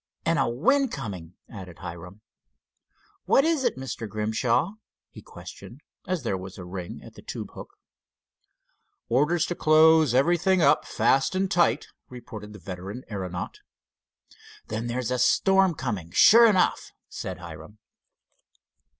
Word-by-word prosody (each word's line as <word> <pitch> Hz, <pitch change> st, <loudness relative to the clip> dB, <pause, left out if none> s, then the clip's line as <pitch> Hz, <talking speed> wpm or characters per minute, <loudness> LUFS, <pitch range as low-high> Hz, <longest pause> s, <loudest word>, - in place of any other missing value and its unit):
"And 165 Hz, -2 st, +2 dB
a 135 Hz, -, +1 dB
wind 270 Hz, -, +2 dB
coming," 95 Hz, -9 st, -7 dB
added 90 Hz, -5 st, -10 dB
Hiram. 90 Hz, +3 st, -9 dB, 1.0 s
"What 275 Hz, -, +4 dB
is 320 Hz, -4 st, +1 dB
it, -, -, 0 dB
Mr. 120 Hz, -4 st, -6 dB
Grimshaw?" 110 Hz, -, 0 dB, 0.4 s
he -, -, -12 dB
questioned, 125 Hz, +6 st, -12 dB, 0.3 s
as 180 Hz, -5 st, -2 dB
there 95 Hz, -5 st, -2 dB
was 95 Hz, 0 st, -9 dB
a 90 Hz, -, -8 dB
ring 90 Hz, -1 st, -7 dB
at -, -, -13 dB
the -, -, -14 dB
tube -, -, -7 dB
hook. -, -, -11 dB, 1.3 s
"Orders 150 Hz, +7 st, +2 dB
to -, -, -3 dB
close 155 Hz, -4 st, +4 dB
everything 175 Hz, +6 st, +3 dB
up 145 Hz, -4 st, +3 dB
fast 135 Hz, +7 st, +1 dB
and 190 Hz, 0 st, 0 dB
tight," 175 Hz, -2 st, +2 dB, 0.2 s
reported 110 Hz, -4 st, -10 dB
the 105 Hz, -, -11 dB
veteran 95 Hz, +6 st, -8 dB
aeronaut. 90 Hz, -3 st, -5 dB, 1.1 s
"Then 110 Hz, +2 st, -3 dB
there's 125 Hz, 0 st, -3 dB
a 125 Hz, -, 0 dB
storm 190 Hz, +7 st, +3 dB
coming, 105 Hz, -, -4 dB
sure 230 Hz, -, +7 dB
enough," 190 Hz, -4 st, +1 dB, 0.2 s
said -, -, -6 dB
Hiram. -, -, -11 dB
125 Hz, 135 wpm, -25 LUFS, -, 1.3 s, sure